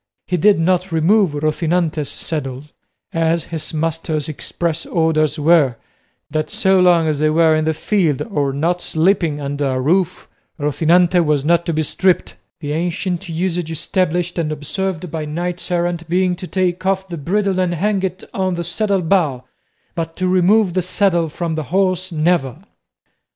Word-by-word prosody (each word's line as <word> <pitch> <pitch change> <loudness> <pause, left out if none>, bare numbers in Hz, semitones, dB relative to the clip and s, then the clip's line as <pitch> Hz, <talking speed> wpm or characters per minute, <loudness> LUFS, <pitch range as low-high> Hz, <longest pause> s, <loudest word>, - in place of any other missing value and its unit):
He 180 - -1
did 200 +4 +4
not 180 +2 +1
remove 170 +2 +3
Rocinante's 155 0 0
saddle, 135 -4 -4 0.5
as 165 0 +1
his 160 -2 -5
master's 160 -1 -2
express 165 +2 -3
orders 160 -2 +1
were, 150 -4 +4 0.6
that 155 0 -1
so 190 0 +2
long 175 -3 +4
as 150 -2 0
they 155 0 +3
were 160 0 +4
in 155 0 0
the 160 - +1
field 165 -6 0
or 145 -11 -1
not 170 +6 -1
sleeping 165 -3 +1
under 145 0 -2
a 130 -1 -1
roof 180 +6 0 0.3
Rocinante 170 +5 +3
was 150 -3 +1
not 170 +1 +2
to 170 - 0
be 155 0 0
stripped 185 +4 +1 0.3
the 145 -2 -4
ancient 175 +2 -2
usage 170 0 -2
established 175 +1 -1
and 155 -2 -1
observed 175 +3 -3
by 160 -1 -3
knights 175 +4 -4
errant 175 -1 -1
being 180 +1 +1
to 185 - -7
take 180 -1 -1
off 190 0 0
the 175 - -6
bridle 190 +5 0
and 180 -2 0
hang 200 +3 0
it 190 0 -3
on 185 -2 -1
the 170 - -3
saddle 195 +2 0
bow, 160 -8 +1 0.5
but 165 -1 -4
to 185 - -1
remove 185 +2 +3
the 185 - +1
saddle 180 -2 +1
from 165 +1 -3
the 155 -1 -3
horse 185 +3 0
never! 155 -4 +1
170 Hz, 165 wpm, -18 LUFS, 155-185 Hz, 0.6 s, did